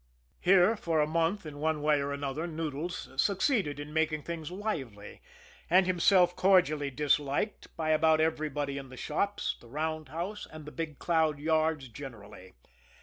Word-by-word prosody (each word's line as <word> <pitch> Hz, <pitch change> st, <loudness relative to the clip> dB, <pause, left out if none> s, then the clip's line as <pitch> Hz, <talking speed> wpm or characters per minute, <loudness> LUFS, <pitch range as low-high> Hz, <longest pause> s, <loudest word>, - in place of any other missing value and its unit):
Here, 190 Hz, +4 st, +5 dB
for 165 Hz, -6 st, -1 dB
a 150 Hz, -, +4 dB
month, 165 Hz, +5 st, 0 dB
in 145 Hz, -2 st, -8 dB
one 155 Hz, -1 st, 0 dB
way 150 Hz, -1 st, +3 dB
or 140 Hz, 0 st, -2 dB
another, 140 Hz, +3 st, -3 dB
Noodles 160 Hz, +1 st, -4 dB
succeeded 195 Hz, -, +1 dB
in 145 Hz, +1 st, -7 dB
making 155 Hz, -1 st, 0 dB
things 165 Hz, -3 st, -5 dB
lively, 150 Hz, -, -5 dB, 0.5 s
and 185 Hz, +2 st, +5 dB
himself 180 Hz, 0 st, +4 dB
cordially 175 Hz, -7 st, +3 dB
disliked 145 Hz, -, 0 dB
by 160 Hz, -1 st, 0 dB
about 155 Hz, 0 st, +4 dB
everybody 150 Hz, -3 st, -1 dB
in 135 Hz, -1 st, -10 dB
the 130 Hz, -, -11 dB
shops, 200 Hz, +10 st, -1 dB
the 120 Hz, -, -15 dB
roundhouse, 160 Hz, -, -4 dB
and 155 Hz, -1 st, -10 dB
the 150 Hz, -, -8 dB
Big 155 Hz, -3 st, -5 dB
Cloud 160 Hz, -3 st, +1 dB
yards 155 Hz, -2 st, +1 dB
generally. 110 Hz, -7 st, -11 dB
155 Hz, 150 wpm, -30 LUFS, 145-170 Hz, 0.5 s, Here